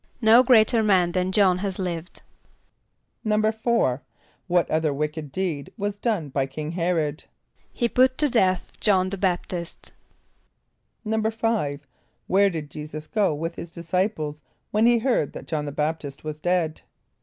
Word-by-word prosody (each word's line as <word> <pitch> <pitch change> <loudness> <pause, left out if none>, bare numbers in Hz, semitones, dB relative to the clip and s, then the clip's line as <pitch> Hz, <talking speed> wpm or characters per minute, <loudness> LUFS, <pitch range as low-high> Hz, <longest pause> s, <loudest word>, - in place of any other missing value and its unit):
="No 225 +1 +7
greater 230 -3 +5
man 185 -5 +3
than 185 +1 0
J[)o]hn 190 -3 +4
has 195 -1 -3
lived."= 175 -2 -5 1.0
=4.= 215 - +1 0.5
What 175 -1 +2
other 155 -1 +1
wicked 150 +1 -3
deed 170 -6 -3
was 205 -1 -3
done 205 -11 -1
by 135 0 -1
King 150 +3 -5
H[)e]r´od? 165 -4 -1 0.5
=He 240 - 0
put 255 +2 +3
to 300 - +3
death 190 -8 +1
J[)o]hn 190 -3 +3
the 195 - -3
B[)a]p´t[)i]st.= 175 -2 -3 1.1
=5.= 220 -8 0 0.5
Where 200 +2 +4
did 155 -5 -6
J[=e]´[s+]us 155 +1 -7
go 200 -6 +1
with 165 +3 -3
his 170 - -6
disciples, 170 -3 -2 0.3
when 215 +2 +3
he 240 0 +5
heard 230 - 0
that - - -8
J[)o]hn 150 -2 -2
the 145 - -4
B[)a]p´t[)i]st 150 -1 -3
was 155 -1 -5
dead? 175 -3 0
180 Hz, 145 wpm, -24 LUFS, 155-215 Hz, 1.1 s, ="No